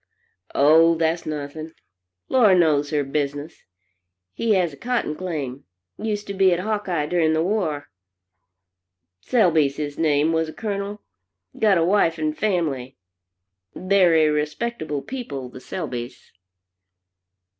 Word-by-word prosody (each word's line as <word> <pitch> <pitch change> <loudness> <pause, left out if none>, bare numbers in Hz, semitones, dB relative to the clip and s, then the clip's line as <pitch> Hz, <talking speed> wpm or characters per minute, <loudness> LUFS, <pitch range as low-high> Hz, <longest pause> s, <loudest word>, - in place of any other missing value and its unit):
"Oh, 160 +4 +5
that's 165 +1 -1
nothing. 155 +1 -6 0.5
Laura 215 -8 +5
knows 150 -4 +3
her 150 -1 0
business. 145 +2 -4 0.7
He 225 -2 +1
has 175 -5 +1
a - - -9
cotton 235 - -2
claim. 145 -7 -5 0.3
Used 210 -1 -3
to 200 - -5
be 190 -1 +4
at 175 - +1
Hawkeye 195 -6 -1
during 160 -1 +1
the 160 0 +1
war. 170 -7 -1 1.3
"Selby's 160 - +2
his 145 -1 -5
name, 155 0 +2
was 160 -1 0
a - - -9
Colonel. 205 -1 -4 0.6
Got 210 -4 +4
a 165 - +2
wife 170 -3 +2
and 155 -1 -1
family. 155 -11 -2 0.8
Very 180 -5 +3
respectable 150 +1 -2
people, 145 - -6
the 130 - -12
Selby's." 125 -7 -6
160 Hz, 125 wpm, -23 LUFS, 150-195 Hz, 1.3 s, Oh